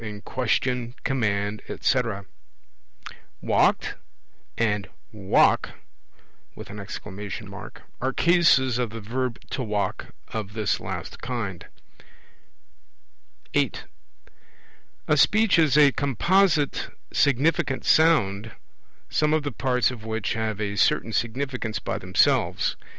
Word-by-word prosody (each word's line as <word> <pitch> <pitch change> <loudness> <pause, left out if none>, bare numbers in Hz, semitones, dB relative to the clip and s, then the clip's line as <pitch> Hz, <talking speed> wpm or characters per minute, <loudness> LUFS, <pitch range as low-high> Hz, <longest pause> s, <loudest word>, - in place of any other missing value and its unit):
in 105 -2 -6
question, 125 0 -1
command, 105 -5 -1
etc. 115 -6 0 1.1
'Walked?' - - +2 0.6
and 105 -3 0 0.2
'Walk!' 100 -3 +3 0.9
are 105 +6 -7
Cases 135 -8 +4
of 120 -2 0
the 115 +1 -7
verb 120 +3 -3
'to 135 - -2
walk' 105 -4 -2 0.2
of 105 -2 -5
this 110 -2 0
last - - -6
kind. 110 -8 -4 1.9
(8) - - 0 1.2
A 150 - +4
Speech 205 +5 +4
is 150 -3 +4
a 145 -2 +7
composite 150 - +1 0.2
significant 145 +1 +1
sound, 110 -10 +3 0.5
some 150 0 +1
of 155 - 0
the 145 - -3
parts 125 0 +1
of 120 -4 -9
which 110 -2 -2
have 110 -2 -2
a 100 -1 -2
certain 115 - +2
significance 120 -2 -2
by - - -3
themselves. - - +2
120 Hz, 100 wpm, -25 LUFS, 105-140 Hz, 1.9 s, a